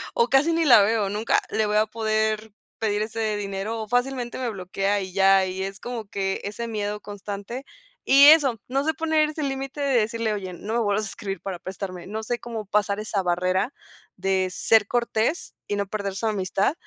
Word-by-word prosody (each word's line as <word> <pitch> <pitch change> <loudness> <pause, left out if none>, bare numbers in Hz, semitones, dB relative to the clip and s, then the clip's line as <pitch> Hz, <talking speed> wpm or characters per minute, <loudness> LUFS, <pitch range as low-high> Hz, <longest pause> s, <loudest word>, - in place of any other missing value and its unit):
o 470 -1 +3
casi 285 +5 +4
ni 330 -1 +2
la 235 -6 +8
veo, 210 -2 +1
nunca 210 +3 +1
le 220 - +1
voy 210 0 +1
a 215 - +4
poder 215 0 -1 0.3
pedir 210 -1 0
ese 220 -1 -2
dinero 205 +3 -3
o 215 - -6
fácilmente 245 0 -1
me 250 -2 -1
bloquea 195 +1 -1
y 185 -1 -6
ya, 195 -1 +5
y 185 +1 -4
es 195 +1 -6
como 235 -4 -5
que 195 -1 -2
ese 230 +3 -4
miedo 210 -1 -3
constante. 205 +5 -7 0.4
Y 280 +2 +8
eso, 285 -7 +6
no 275 +3 0
se 315 - +1
poner 315 0 +2
ese 305 -1 -4
límite 270 +1 -4
de 275 -3 +2
decirle: 225 0 -1
“Oye, 190 -3 -5
no 210 +5 -6
me - - +2
vuelvas 205 0 +1
a - - -6
escribir 195 -3 -6
para 185 -3 -5
prestarme”. 185 -1 -6
No 220 +2 -4
sé 240 +2 -2
cómo 225 -2 -6
pasar 205 0 0
esa 210 -2 -1
barrera 185 +7 0 0.4
de 190 -1 +1
ser 205 +2 +3
cortés 235 +5 -1
y 205 - -1
no 200 -1 -1
perder 200 -2 -4
su 225 - -3
amistad, 195 +3 0
215 Hz, 205 wpm, -24 LUFS, 195-240 Hz, 0.4 s, la